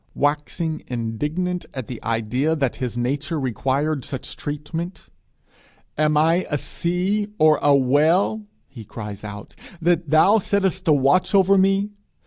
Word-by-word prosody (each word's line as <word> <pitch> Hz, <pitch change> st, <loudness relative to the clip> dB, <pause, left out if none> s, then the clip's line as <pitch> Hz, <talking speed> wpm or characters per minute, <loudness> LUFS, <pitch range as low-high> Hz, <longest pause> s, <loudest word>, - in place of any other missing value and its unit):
Waxing 150 Hz, +2 st, -1 dB
indignant 150 Hz, +10 st, -3 dB
at 130 Hz, -3 st, -4 dB
the 120 Hz, -1 st, -8 dB
idea 115 Hz, +7 st, 0 dB
that 135 Hz, -5 st, -1 dB
his 125 Hz, -2 st, -4 dB
nature 140 Hz, +6 st, -2 dB
required 135 Hz, +3 st, -1 dB
such 130 Hz, +1 st, -6 dB
treatment 160 Hz, +5 st, -6 dB, 0.9 s
'Am 150 Hz, 0 st, +2 dB
I 165 Hz, +4 st, +3 dB
a 145 Hz, -, 0 dB
sea 185 Hz, +8 st, -1 dB
or 155 Hz, -1 st, +5 dB
a 145 Hz, -1 st, +5 dB
whale,' 155 Hz, +11 st, +2 dB, 0.3 s
he 120 Hz, -5 st, -11 dB
cries 105 Hz, -1 st, -8 dB
out, 105 Hz, -1 st, -9 dB, 0.2 s
'that 170 Hz, -1 st, +1 dB
thou 190 Hz, +8 st, +5 dB
settest 190 Hz, -2 st, -1 dB
a -, -, +5 dB
watch 145 Hz, +8 st, +3 dB
over 195 Hz, 0 st, +5 dB
me?' 195 Hz, +2 st, +2 dB
150 Hz, 135 wpm, -22 LUFS, 130-180 Hz, 0.9 s, or